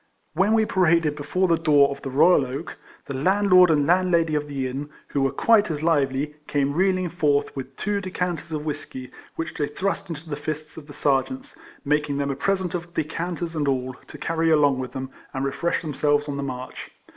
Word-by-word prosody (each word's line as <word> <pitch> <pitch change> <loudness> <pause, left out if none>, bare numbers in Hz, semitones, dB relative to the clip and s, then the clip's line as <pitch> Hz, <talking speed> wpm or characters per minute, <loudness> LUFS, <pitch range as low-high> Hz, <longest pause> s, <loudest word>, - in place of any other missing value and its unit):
When 190 +6 +2
we 220 -1 +3
paraded 170 -6 +2
before 180 +6 0
the 165 -1 +3
door 145 -3 +5
of 140 - -7
the 135 - -5
Royal 145 +4 +5
Oak, 135 +5 -6 0.3
the 140 - -5
landlord 185 +5 +5
and 150 -3 +3
landlady 170 -2 +3
of 150 -1 -1
the 140 -2 -3
inn, 140 +3 -5 0.2
who 140 - -1
were 135 - +3
quite 220 -4 +3
as 155 -1 -3
lively, 145 -2 +1
came 140 -1 0
reeling 185 +2 +2
forth, 150 -4 0
with 135 -2 -7
two 205 -1 -1
decanters 180 -4 -3
of 150 -1 -3
whiskey, 130 -4 -6 0.2
which 165 - -4
they 145 - -1
thrust 190 +4 -3
into 165 0 -7
the 150 - -3
fists 155 +1 -5
of 155 -2 -10
the 145 - -10
Sergeants, 260 - 0 0.3
making 150 0 +1
them 140 0 -1
a - - -3
present 190 0 -1
of 175 0 -5
decanters 170 +2 -3
and 150 -2 0
all, 130 -1 -1
to - - -10
carry 165 0 0
along 145 -4 +4
with 130 -1 -5
them, 130 -1 -5 0.2
and 135 +1 -1
refresh 170 +6 -1
themselves 145 -1 +1
on 145 - -3
the - - -2
march. 130 -2 -6
150 Hz, 205 wpm, -24 LUFS, 140-175 Hz, 0.3 s, door